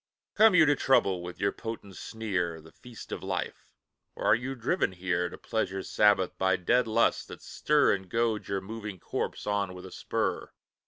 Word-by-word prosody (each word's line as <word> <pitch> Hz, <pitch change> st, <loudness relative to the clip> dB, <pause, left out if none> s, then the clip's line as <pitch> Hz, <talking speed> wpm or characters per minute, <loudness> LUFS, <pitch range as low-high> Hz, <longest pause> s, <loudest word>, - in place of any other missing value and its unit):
Come 220 Hz, -3 st, +6 dB
you 155 Hz, -, +7 dB
to 145 Hz, -1 st, +4 dB
trouble 100 Hz, -10 st, +2 dB
with 90 Hz, 0 st, -8 dB
your 100 Hz, 0 st, +1 dB
potent 110 Hz, -4 st, -7 dB
sneer 95 Hz, -6 st, -3 dB
The 80 Hz, +1 st, -16 dB
feast 120 Hz, +3 st, -12 dB
of -, -, -4 dB
Life! -, -, -4 dB, 0.5 s
or -, -, -5 dB
are -, -, +6 dB
you 130 Hz, +3 st, -4 dB
driven 125 Hz, -, 0 dB
here, 90 Hz, -1 st, -1 dB
To -, -, -10 dB
Pleasure's 95 Hz, -4 st, -3 dB
Sabbath, 105 Hz, -3 st, +3 dB
by 95 Hz, 0 st, +3 dB
dead 120 Hz, +8 st, +2 dB
lusts 110 Hz, +1 st, +2 dB
that -, -, -11 dB
stir 150 Hz, -1 st, +2 dB
And 95 Hz, -2 st, -5 dB
goad 115 Hz, -1 st, 0 dB
your 100 Hz, -1 st, -2 dB
moving 105 Hz, -1 st, -7 dB
corpse -, -, -4 dB
on 100 Hz, -3 st, -1 dB
with 90 Hz, 0 st, -10 dB
a 95 Hz, -, -10 dB
spur? -, -, -2 dB
100 Hz, 190 wpm, -29 LUFS, 95-115 Hz, 0.5 s, you